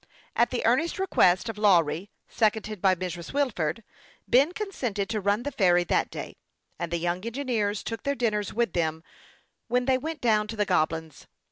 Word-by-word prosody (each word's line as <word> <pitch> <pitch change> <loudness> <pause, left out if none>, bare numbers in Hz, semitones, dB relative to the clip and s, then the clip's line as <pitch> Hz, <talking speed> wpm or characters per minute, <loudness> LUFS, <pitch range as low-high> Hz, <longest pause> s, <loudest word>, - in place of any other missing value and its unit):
At 240 - +3
the 250 - -2
earnest 260 +9 +2
request 235 - +3
of 220 -2 -5
Lawry, 180 -2 +3 0.2
seconded 215 -3 0
by 190 -2 +4
Mrs. 175 -1 -6
Wilford, 225 - -1 0.4
Ben 275 +7 +4
consented 250 - -3
to 215 -2 -1
run 205 +4 +1
the 285 - -3
ferry 180 -6 +3
that - - +1
day, - - -7 0.4
and 170 -1 -4
the 170 - +1
young 175 +2 -2
engineers 230 -4 -1
took 225 -1 -5
their 280 0 -1
dinners 210 -5 -1
with 235 -4 0
them 160 -1 -1 0.6
when 250 +1 +1
they 260 -1 +2
went 320 +3 -5
down 215 -3 +2
to 225 - -6
the 210 -1 +1
Goblins. 160 -3 -1
210 Hz, 175 wpm, -27 LUFS, 180-245 Hz, 0.6 s, by